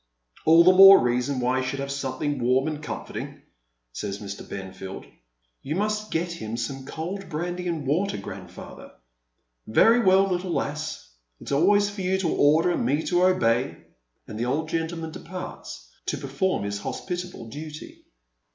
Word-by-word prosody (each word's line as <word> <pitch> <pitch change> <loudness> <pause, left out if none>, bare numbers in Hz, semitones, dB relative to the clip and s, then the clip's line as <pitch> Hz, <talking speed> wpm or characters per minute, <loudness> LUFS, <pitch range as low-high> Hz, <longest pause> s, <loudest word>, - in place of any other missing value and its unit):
"All 165 +1 +8
the 185 +2 +7
more 195 +1 +10
reason 125 +2 0
why 125 +1 +1
he 130 - -3
should 135 +1 -3
have 140 0 -3
something 140 +1 -2
warm 130 +4 +2
and 155 -1 -4
comforting," 150 - -7 0.5
says 100 +7 -4
ilr. 100 -1 -8
Benfield. 95 0 -7 0.3
" - - -47
You 150 - -3
must 210 +2 -1
get 170 +2 -1
him 115 -9 -5
some 135 +3 -5
cold 180 +6 -5
brandy 175 +3 -3
and 165 -4 -3
water, 175 +9 0
grandfather.'' 100 - -10 0.5
" - - -48 0.2
Very 225 - +5
well, 190 -3 +5
little 180 -1 -2
lass, 150 - -3 0.3
it's - - -8
always 200 +8 +3
for 205 -1 -6
you 185 +1 +1
to 185 -3 0
order 155 +5 +4
and 175 - -1
me 145 +6 +1
to 180 0 +2
obey; 125 -9 +2 0.2
" - - -49
and 110 - -7
the 120 - 0
old 155 +5 -1
gentleman 165 0 -3
departs 165 - -8 0.2
to - - -1
perform 140 - -1
his 100 0 -3
hospitable 180 - -5
duty. 150 +4 -9
150 Hz, 170 wpm, -25 LUFS, 125-180 Hz, 0.5 s, more